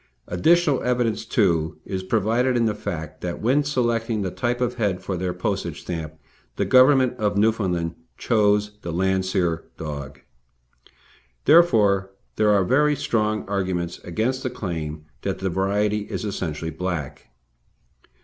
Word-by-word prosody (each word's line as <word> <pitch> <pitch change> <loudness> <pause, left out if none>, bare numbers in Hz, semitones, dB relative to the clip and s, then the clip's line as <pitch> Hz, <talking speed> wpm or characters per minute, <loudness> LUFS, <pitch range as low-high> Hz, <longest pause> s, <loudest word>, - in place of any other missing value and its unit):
Additional 155 - +3
evidence, 120 -3 0
too, 85 -8 +1
is 95 -1 -3
provided, 115 +6 +1
in 115 - +2
the 110 - +1
fact 80 -6 -6
that 90 -1 -4
when 130 +6 +2
selecting 120 -6 0
the 95 - -2
type 120 +4 -1
of 125 -1 0
head 100 -6 -1
for 95 - -3
their 90 0 -2
postage 90 0 -3
stamp 80 -3 -5 0.4
the - - 0
Government 130 -1 +5
of 105 -1 0
Newfoundland 95 -6 +1 0.2
chose 105 -2 +1
the 85 - -5
Landseer 95 -1 0
dog. 70 -3 -6 1.3
Therefore, 105 - +5 0.3
there 105 -1 +3
are 100 -2 +4
very 150 +6 +3
strong 110 -6 -1
arguments 95 -3 -2
against 115 +9 -2
the 130 - -2
claim 80 -10 -5 0.2
that - - -2
the 95 0 -2
true - - -5
variety 105 +3 +1
is - - -4
essentially 80 -5 -3
black. 80 -4 -4
100 Hz, 140 wpm, -23 LUFS, 90-115 Hz, 1.3 s, Government